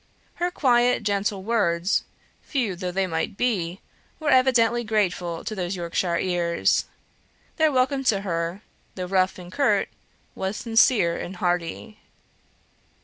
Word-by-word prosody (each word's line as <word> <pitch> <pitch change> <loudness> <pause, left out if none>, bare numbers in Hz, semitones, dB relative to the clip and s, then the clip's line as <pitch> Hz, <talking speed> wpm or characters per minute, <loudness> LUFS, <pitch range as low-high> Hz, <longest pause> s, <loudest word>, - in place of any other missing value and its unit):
Her 350 - +2
quiet, 245 -8 +2
gentle 200 -1 -1
words, 190 -5 +1 0.4
few 240 - -2
though 180 0 -4
they 190 +2 0
might 165 +2 -3
be, 190 -7 -1 0.4
were 305 -2 0
evidently 240 -2 +4
grateful 180 -6 -1
to - - -4
those 185 -2 -3
Yorkshire 170 0 -1
ears. 175 -2 +1 0.7
Their 315 -2 +4
welcome 270 +1 +1
to 200 -5 +2
her, 170 +1 -3 0.3
though 185 - -4
rough 185 0 +1
and 180 -1 -10
curt, 280 +5 +2 0.4
was 190 +3 -3
sincere 225 -6 +3
and 185 - -6
hearty. 180 +4 -2
195 Hz, 130 wpm, -24 LUFS, 175-240 Hz, 0.7 s, evidently